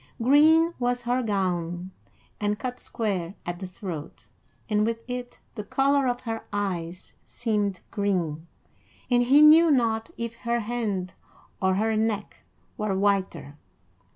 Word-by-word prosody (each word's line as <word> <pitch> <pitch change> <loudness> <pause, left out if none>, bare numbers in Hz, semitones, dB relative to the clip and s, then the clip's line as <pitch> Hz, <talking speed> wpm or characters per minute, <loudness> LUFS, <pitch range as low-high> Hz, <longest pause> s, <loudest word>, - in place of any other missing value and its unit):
Green 310 +7 +5
was 245 0 0
her 245 +2 +1
gown, 180 -4 -2 0.5
and 210 0 0
cut 250 +3 -5
square 195 -6 -3
at 175 0 -4
the 190 - -5
throat, 175 -4 -8 0.4
and 210 -1 +2
with 230 +1 -1
it 245 -1 -6
the 210 - -6
color 275 +4 +2
of 245 0 -1
her 225 -2 -4
eyes 185 -4 -4
seemed 210 -5 -2
green, 175 -6 -1 0.6
and 245 0 +5
he 275 +5 +6
knew 320 +2 +8
not 230 -5 +1
if 235 0 -5
her 235 0 -1
hand 210 -5 -3 0.5
or 190 -1 +2
her 220 +2 +1
neck 215 -1 -1 0.4
were 210 -3 0
whiter. 190 -7 -1
215 Hz, 135 wpm, -26 LUFS, 190-245 Hz, 0.6 s, knew